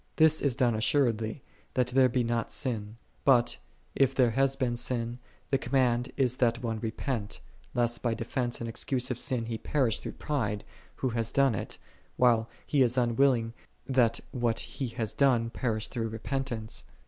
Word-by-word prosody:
This 160 -1 +4
is 140 -4 +1
done 125 -3 +2
assuredly, 115 0 +1 0.3
that 125 -2 +2
there 130 0 +4
be 125 0 +1
not 115 -1 -1
sin; 110 -4 -2 0.3
but, 125 -3 +4 0.3
if 135 -1 +2
there 125 -3 +4
hath 135 +3 +2
been 120 -2 0
sin, 120 0 -2 0.3
the 135 - +3
command 125 -2 +1
is 130 -2 +1
that 120 0 +1
one 115 -2 -2
repent; 110 0 -3 0.4
lest 120 -1 +1
by 120 -2 0
defense 120 +2 -2
and 115 - -4
excuse 125 +2 -1
of 125 - -2
sin 120 -3 -1
he 115 -1 -4
perish 130 -7 +1
through - - -6
pride, 110 -9 -2 0.3
who 130 - -1
hath 115 -1 -2
done 135 -3 +4
it, 100 - -5 0.4
whilst 115 -2 +4 0.2
he 145 - +2
is 125 0 +3
unwilling 120 -1 +2 0.3
that 125 -4 +2
what 120 -3 0
he 135 - -4
hath 115 -3 -4
done 120 -5 +3
perish 110 -2 -2
through 115 -3 -3
repentance. 115 0 -3
120 Hz, 170 wpm, -29 LUFS, 115-130 Hz, 0.4 s, This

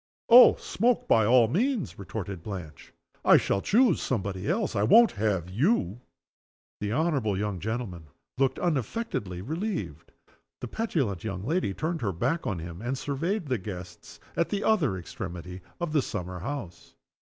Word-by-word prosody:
"Oh! 245 +2 +9
smoke 240 +3 0
by 110 -2 +4
all 120 -1 +6
means!" 225 - -1
retorted 100 -1 -6
Blanche. 85 -6 -8 0.3
"I - - +7
shall 100 - 0
choose 240 - +3
somebody 100 -5 -2
else. 195 - 0
I 100 - +1
won't 230 - +6
have 100 -5 -1
you!" 115 - 0 0.8
The 105 0 -2
honorable 135 - 0
young 100 -2 -2
gentleman 100 -6 -4 0.3
looked 135 -1 +2
unaffectedly 135 - -2
relieved. 160 - -4 0.5
The 125 - -5
petulant 140 - -2
young 95 -4 -4
lady 150 - 0
turned 160 +1 -2
her 100 -5 -1
back 130 - -1
on 100 -6 -1
him, 85 +2 -7
and 125 +3 -2
surveyed 165 +9 -2
the 130 -5 -1
guests 90 -2 -9 0.2
at 170 - +1
the 205 0 -2
other 150 - +2
extremity 90 +1 -7 0.2
of 170 -3 -3
the 150 - +4
summer 90 -6 -5
house. 95 -7 -7
115 Hz, 155 wpm, -27 LUFS, -, 0.8 s, Oh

